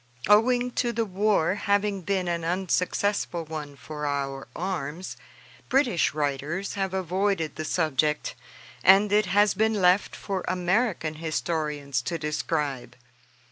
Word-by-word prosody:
Owing 245 +4 +4
to 240 -1 0
the 230 0 -1
war 195 -3 +2
having 200 0 0
been 185 0 -1
an 170 -1 -1
unsuccessful 180 0 0
one 150 -2 -6
for 150 +1 -6
our 135 -1 -3
arms, 175 -2 -4 0.5
British 250 - +2
writers 150 +6 -2
have 195 -2 -2
avoided 185 -3 0
the 155 - -4
subject, 150 -2 0 0.5
and 195 +2 +6
it 210 -1 +3
has 205 +2 +4
been 220 0 +1
left 180 +2 +3
for 195 -3 -4
American 185 -2 0
historians 150 -4 -2
to 170 +7 -3
describe. 150 -3 -2
180 Hz, 125 wpm, -26 LUFS, 155-200 Hz, 0.5 s, and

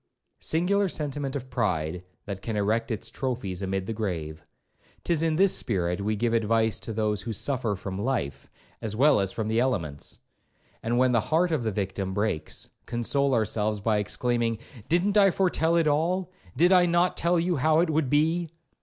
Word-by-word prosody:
Singular 195 +4 +1
sentiment 145 -3 -3
of 130 -2 -6
pride, 90 -8 -1 0.2
that 100 -2 -6
can 110 +1 -4
erect 110 +3 0
its 110 - -3
trophies 115 -8 -3
amid 95 0 -2
the 115 - -3
grave. 80 -8 -4 0.6
'Tis 170 -3 +1
in 165 -1 +1
this 195 +3 +4
spirit 90 -3 0
we 105 +2 0
give 115 +2 0
advice 115 -1 +2
to - - -5
those 105 -2 -1
who 115 - -5
suffer 115 0 -1
from 95 0 -5
life, 120 - -2 0.3
as 110 -2 -4
well 145 +3 +5
as 95 -1 0
from 110 -2 -3
the 110 +1 +1
elements; 85 - -2 0.6
and 120 +1 -1
when 130 0 +4
the 115 -2 +3
heart 165 +6 +1
of 155 -5 +1
the 110 -2 -1
victim 95 -1 -3
breaks, 105 -6 -2 0.2
console 135 +3 +1
ourselves 110 -1 0
by 105 +1 +1
exclaiming, 115 +2 0 0.3
'Didn't 185 +5 +2
I 195 -1 +6
foretell 170 -3 +1
it 165 -1 +3
all?did 175 +3 0
I 180 -1 +6
not 175 +1 +2
tell 170 +1 +2
you 175 0 0
how 155 +4 +3
it 170 -2 +1
would 155 -3 +1
be?' 160 +4 +2
120 Hz, 180 wpm, -26 LUFS, 105-160 Hz, 0.6 s, I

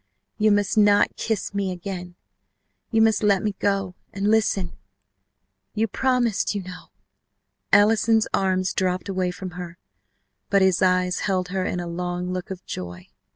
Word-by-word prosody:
_ - - -48 0.4
You 215 - +6
must 205 +1 +2
not 205 -1 +4
kiss 220 -2 -2
me 200 -2 -1
again. 180 -1 -6 0.7
You 225 -1 +3
must 220 -1 +3
let 200 -3 +3
me 210 - 0
go, 195 -2 0 0.2
and 200 +2 0
listen 200 -4 +1 1.0
You 220 +1 +1
promised, 245 -3 0
you 200 - -3
know 180 0 -10 0.5
!" - - -54
Allison's 220 +1 +4
arms 185 -1 +1
dropped 185 +1 -1
away 185 -2 0
from 185 +1 -6
her, 175 -1 -8 0.7
but 195 -1 +4
his 190 -2 +3
eyes 185 -1 +2
held 185 -1 0
her 190 0 -2
in 180 - -2
a 175 - -4
long 180 +1 -3
look 185 -1 -5
of 185 -1 -7
joy. 90 0 -7
190 Hz, 160 wpm, -24 LUFS, 180-205 Hz, 1.0 s, You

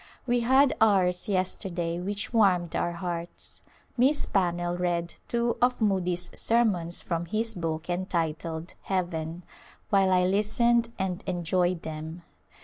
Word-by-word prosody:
We 245 -1 +2
had 265 +3 +4
ours 185 -4 +3
yesterday 180 -3 -1
which 200 +5 -4
warmed 185 -7 +3
our 175 - 0
hearts. 170 0 -5 0.3
Miss 270 +4 +3
Pannell 175 -2 0
read 175 -1 -1
two 235 0 0
of 250 0 +3
Moody's 180 -4 0
sermons 200 -8 +1
from 170 0 -2
his 225 +5 -1
book 165 -3 -3
entitled 165 -2 -2
" - - -37
Heaven," 175 -2 -2 0.5
while 195 -2 +4
I 180 -1 +4
listened 230 +4 +2
and 190 -2 -2
enjoyed 175 0 0
them. 160 +2 -6
180 Hz, 130 wpm, -27 LUFS, 170-210 Hz, 0.5 s, had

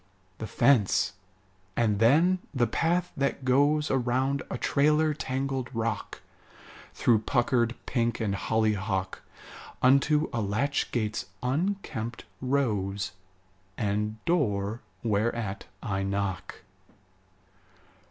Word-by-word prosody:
The 110 - -4
fence; 115 -7 +3 0.6
and 105 -4 +2
then 160 +11 +4 0.2
the 125 -2 +3
path 170 +9 0
that 140 -1 -1
goes 145 +4 +3
Around 130 +2 +1
a - - -3
trailer 150 +2 +2
tangled 135 -2 -2
rock, 115 -2 -3 0.7
Through 115 -3 +3
puckered 120 0 +1
pink 120 -2 0
and 105 -4 0
hollyhock, 100 -3 0 0.6
Unto 140 +4 +4
a 115 - 0
latch 110 +8 0
gate's 110 -3 -2 0.2
unkempt 130 - -2 0.2
rose, 105 -8 0 0.7
And 105 +1 -1
door 110 - 0 0.2
whereat 110 -2 -1 0.2
I 95 -2 -1
knock. 100 -1 -3
120 Hz, 95 wpm, -28 LUFS, 105-140 Hz, 0.7 s, then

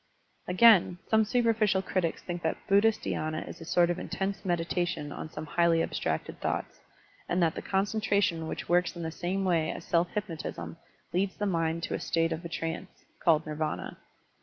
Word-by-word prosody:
Again, 185 -2 +6
some 220 0 +5
superficial 220 -4 +2
critics 185 -4 -1
think 175 -1 -4
that 160 - -1
Buddhist 205 +2 +4
dhySna 155 0 -2
is - - -9
a - - -7
sort 175 +1 +3
of 175 - -3
intense 195 +1 -3
meditation 175 -4 -1
on 155 - -6
some 155 0 -6
highly 165 +1 +3
abstracted 80 -1 -3
thoughts, - - -2 0.5
and 175 - +1
that 165 -1 +2
the - - -5
concentration 200 -4 +1
which - - -5
works 175 0 +2
in 170 - -5
the 160 - -3
same 185 +4 -2
way 165 -3 +2
as 165 - -7
self 170 +1 +2
hypnotism 170 -5 -4 0.4
leads 190 +2 0
the 205 - -1
mind 165 -3 0
to - - -2
the - - -2
state 165 -1 0
of 160 +2 -3
a 170 - -6
trance, 165 +3 -5 0.2
called 160 -3 +4
Nirvana. 155 0 -3
175 Hz, 180 wpm, -29 LUFS, 165-195 Hz, 0.5 s, Again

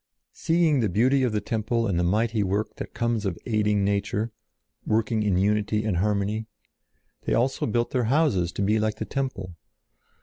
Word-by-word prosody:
Seeing 165 -3 +2
the 110 -4 +1
beauty 130 +9 +3
of 125 -3 +1
the 105 -1 -1
temple 115 +1 -1
and 95 -5 0
the - - +1
mighty 110 +5 +1
work 100 +2 -1
that - - -7
comes 115 -2 0
of 95 -4 -2
aiding 105 -3 +1
nature, 100 +2 -1 0.5
working 110 0 0
in 100 -4 +1
unity 105 +2 +1
and 100 -5 0
harmony, 105 +3 0 0.8
they - - +1
also 130 +3 0
built 120 +1 0
their 125 -3 0
houses 120 - +2
to 100 - -2
be 105 +2 +2
like 110 0 0
the - - -5
temple. 115 -11 -4
110 Hz, 175 wpm, -25 LUFS, 100-120 Hz, 0.8 s, beauty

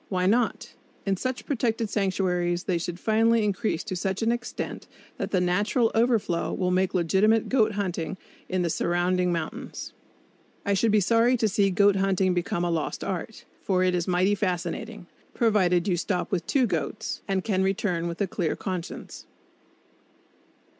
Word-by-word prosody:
Why 185 -2 0
not? 225 +4 +1 0.3
In 195 -1 +1
such 255 +6 -4
protected 230 -4 0
sanctuaries 180 -4 0
they 180 -3 0
should 175 +1 -5
finally 225 +2 +3
increase 205 -3 -1
to 200 -4 -4
such 190 +4 -2
an 225 - +3
extent 240 +1 -4 0.3
that - - -3
the 185 - +2
natural 205 +6 +2
overflow 225 -7 +1
will 180 -1 0
make 185 +1 +1
legitimate 195 +6 +3
goat 220 -5 +3
hunting 185 -3 -3 0.3
in 185 -1 0
the 170 - 0
surrounding 180 +2 +1
mountains. 195 - -5 0.7
I 200 - +2
should 220 +4 +2
be 210 0 +4
sorry 230 +5 +3
to 225 - +2
see 200 0 +2
goat 200 +1 +4
hunting 190 -1 +2
become 175 0 -1
a 175 - 0
lost 165 -2 -2
art; 195 +3 -5 0.2
for 185 -2 +1
it 185 0 +2
is 175 -1 -1
mighty 185 +2 +2
fascinating, 195 +2 -3 0.3
provided 190 -6 +2
you 185 - +2
stop 180 +2 -2
with 175 -4 -1
two 265 -3 +3
goats 160 -10 -3
and 190 -1 0
can 190 -4 0
return 190 -3 0
with 170 0 -5
a 200 - +2
clear 175 -3 -1
conscience. 185 -3 -6
190 Hz, 165 wpm, -26 LUFS, 180-220 Hz, 0.7 s, be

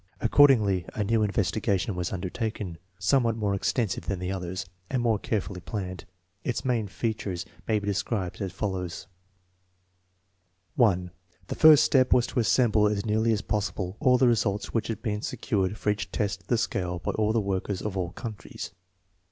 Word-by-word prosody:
Accordingly 115 -8 +5
a 105 - 0
new 110 +2 +2
investigation 100 0 0
was 90 -1 -3
undertaken, 95 -1 -4 0.2
somewhat 115 +4 +2
more 105 -3 0
extensive 100 +1 -1
than 100 - -1
the 90 +1 -3
others, 90 -1 -4 0.2
and 130 - 0
more 115 -3 +2
care 110 - 0
fully 95 -1 -7
planned. 95 +1 -5 0.4
Its 120 - -2
main 120 -5 +1
features 100 -4 -3 0.2
may 110 - +2
be 100 - -4
described 100 -2 -2
as 95 -2 -2
fol 105 -2 -2
lows: 90 -2 -5 1.7
1. 95 - +2 0.4
The - - -1
first 155 -2 +7
step 130 -2 +4
was 125 -1 +4
to - - -2
assemble 110 -1 +3
as 105 0 -1
nearly 110 +1 +2
as 105 -2 0
possible 100 -2 -2
all 130 -4 +4
the 130 - +4
results 105 -4 0
which 115 - 0
had 115 -3 -4
been 105 -1 -1
secured 105 -4 -1
for 105 - +1
each 100 -2 -4
test 100 -2 -1
of - - -30
the 120 - +2
scale 90 -5 -1
by 85 - -2
all 110 0 +1
the 115 - +2
workers 100 -1 -2
of 105 -2 -3
all 90 -2 -1
countries. 110 +1 -7
105 Hz, 175 wpm, -27 LUFS, 95-115 Hz, 1.7 s, first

